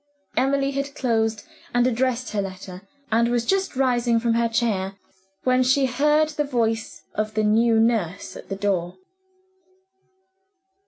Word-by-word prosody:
Emily 275 +1 +1
had 280 +1 -4
closed 225 -4 0 0.3
and 245 0 +4
addressed 255 0 0
her 210 -1 0
letter, 190 -1 -7 0.3
and 230 +1 +3
was 240 -1 0
just 385 0 0
rising 240 -3 +2
from 230 0 +1
her 230 0 +1
chair, 210 -5 -1 0.5
when 255 0 +3
she 260 +2 +3
heard 300 +5 +2
the 300 -1 -1
voice 225 -5 -2
of 215 0 -3
the 215 - +1
new 225 +2 +3
nurse 220 -6 0
at - - -11
the 195 - -2
door. 190 -3 -1
235 Hz, 145 wpm, -23 LUFS, 215-260 Hz, 0.5 s, and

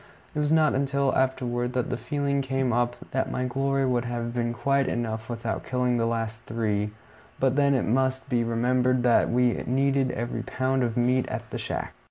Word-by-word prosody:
It - - -2
was 150 0 +1
not 155 -1 +4
until 140 0 +1
afterward 125 -2 0
that 125 -1 -1
the - - 0
feeling 140 +2 -1
came 135 -2 0
up 120 0 +1 0.2
that 130 - 0
my 125 - -2
glory 135 +2 0
would 125 -2 +1
have 120 -1 -3
been 120 -1 0
quite 140 +2 +1
enough 110 -1 -3
without 115 -1 -3
killing 125 -1 0
the 115 0 +1
last 115 -1 -2
three; 105 -2 -1 0.5
but 135 -1 +2
then 140 -1 +3
it 130 - +1
must 130 +3 +1
be 120 -3 +1
remembered 125 +2 +1
that 120 -2 +4
we 125 0 +3
needed 135 +1 +2
every 120 0 -3
pound 130 0 -1
of 120 -2 -1
meat 125 +1 +2
at - - -5
the - - -4
shack. - - -4
125 Hz, 195 wpm, -26 LUFS, 120-135 Hz, 0.5 s, not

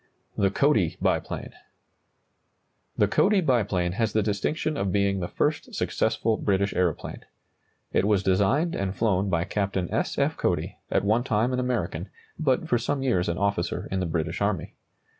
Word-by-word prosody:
THE 100 - +2
CODY 105 - +2
BIPLANE. - - -1 1.4
The - - +4
Cody 205 0 +3
biplane 105 - +1
has 110 +3 -1
the 110 - +2
distinction 150 +10 -1
of 95 -7 -1
being 100 -1 +1
the 85 - -2
first - - -1
successful 110 -1 0
British 100 -1 +1
aeroplane. 90 -4 -1 0.7
It - - +3
was 100 -2 +2
designed 100 - +2
and 100 0 -2
flown 100 -3 +1
by 85 -2 +1
Captain 95 -2 -1
S. - - -1
F. - - +1
Cody, - - -1
at - - +1
one 110 +4 +3
time 115 +1 +1
an 125 - 0
American, 110 -8 -2 0.3
but 150 0 +1
for 120 -5 +2
some 135 +3 -1
years 95 -10 +1
an 85 - -1
officer 100 -3 -1
in 95 - 0
the 90 - -1
British 80 +1 -2
army. 100 -5 -1
100 Hz, 160 wpm, -26 LUFS, 95-120 Hz, 1.4 s, The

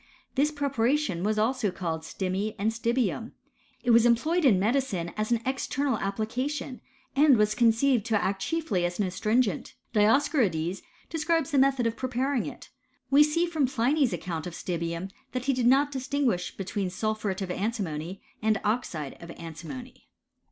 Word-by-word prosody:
This 285 +3 +2
preparation 280 - 0
was 215 +1 +1
also 225 0 +1
called 170 -3 -3
stimmi 190 +5 -3
and 210 +3 +1
stibium. 230 -1 -1 0.5
It 245 - +3
was 230 0 +7
employed 305 +9 +3
in 210 -9 +5
medicine 205 -6 0
as 215 +2 -2
an 235 -1 +2
external 270 -1 -1
application, 250 +7 -3 0.3
and 280 -2 +6
was 210 0 +3
conceived 235 +1 +3
to 220 -3 +2
act 195 0 -1
chiefly 310 - -1
as 175 0 -1
an 205 - +1
astringent; 210 0 0 0.2
Dios 225 +7 +4
corides 185 - 0 0.3
describes 325 0 0
the 280 - +3
method 270 -2 +3
of 230 0 0
preparing 255 +1 -1
it. - - -9 0.4
We 280 +2 +7
see, 300 +3 +3
from 320 -6 +1
Pliny's 265 +2 +2
account 165 -2 -4
of 170 - -7
stibium, 170 +1 -3 0.2
that 255 0 -3
he 275 - +2
did 250 -2 +1
not 280 +3 +4
distinguish 260 -8 -1
between 195 0 -2
sulphuret 205 0 -2
of 185 - -4
antimony 190 -4 -3 0.2
and 215 -1 +2
oxide 205 - -2
of 170 - -10
antimony. 170 +10 -9
225 Hz, 160 wpm, -27 LUFS, 190-270 Hz, 0.5 s, was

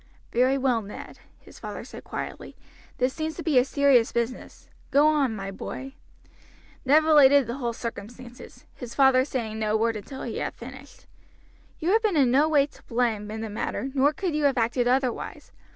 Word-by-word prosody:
"Very 255 +3 +2
well, 255 -4 +1
Ned," 205 0 -10 0.2
his - - -16
father - - -7
said - - -11
quietly; - - -7 0.4
"this 255 +1 0
seems 315 0 -4
to 335 - -7
be 295 -6 +4
a - - +4
serious 275 -4 +3
business. 235 +1 -4 0.2
Go 285 +2 +4
on, 290 -7 +2
my 195 -1 -5
boy." 265 +7 -7 0.9
Ned 295 +4 +5
related 285 -3 +6
the 235 +3 -5
whole 240 -4 -2
circumstances, 240 +2 -9
his 240 -2 -9
father 265 -2 +5
saying 230 -5 -4
no 215 0 +1
word 225 +1 0
until 265 +6 -8
he 235 - -4
had - - -4
finished. 265 +3 -12 0.7
"You 345 +2 -1
have 445 +2 +4
been 420 -7 +1
in 260 -4 +4
no 290 +5 +4
way 290 -3 +4
to 285 - -19
blame 230 -3 -1
in 220 +1 -5
the 225 - -4
matter, 240 +4 -3
nor 280 +1 +3
could 355 +1 -3
you 300 -1 0
have 275 -2 +2
acted 240 +1 +1
otherwise. 255 -1 -1
255 Hz, 185 wpm, -25 LUFS, 235-280 Hz, 0.9 s, related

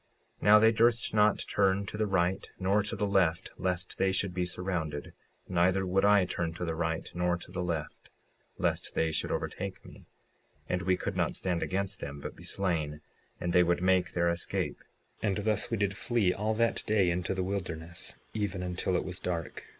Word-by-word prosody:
56:40 - - -14
Now 105 +1 +9
they 110 +1 +6
durst 115 0 +2
not 105 -1 +3
turn 100 0 +2
to 100 - -6
the 110 0 0
right 95 -1 0
nor 100 +2 +2
to 100 - -4
the 105 - 0
left 95 -5 +2
lest 90 -1 -2
they 95 0 +3
should 95 -1 0
be 90 0 0
surrounded; 85 -5 -3 0.3
neither 95 +2 +2
would 95 +1 +2
I 100 -2 +6
turn 85 -2 -3
to 90 - -3
the 80 - -1
right 80 0 -2
nor 90 0 +1
to 85 - -12
the 90 -1 -3
left 80 -4 -4 0.5
lest - - -1
they 80 0 +2
should 80 - -1
overtake 95 0 -4
me, - - -14 0.6
and 90 - -1
we 90 +1 +2
could - - -3
not - - 0
stand 90 -3 -1
against 95 +1 -2
them, 70 0 -6
but - - -7
be - - -13
slain, 80 -6 -1 0.4
and 85 0 -2
they 90 - +6
would 85 0 +2
make 95 -1 +3
their 85 0 +2
escape; 85 0 -1 0.4
and 100 -3 +1
thus 105 -1 0
we 115 - 0
did 100 -1 0
flee 110 -4 +1
all 110 +2 -1
that 115 +1 +1
day 100 -5 +3
into 90 +2 -1
the 95 - -1
wilderness, 85 -3 -3 0.2
even 100 -4 -2
until 90 +1 -1
it - - 0
was 90 0 -5
dark. 85 -4 -4
90 Hz, 200 wpm, -30 LUFS, 85-100 Hz, 0.6 s, Now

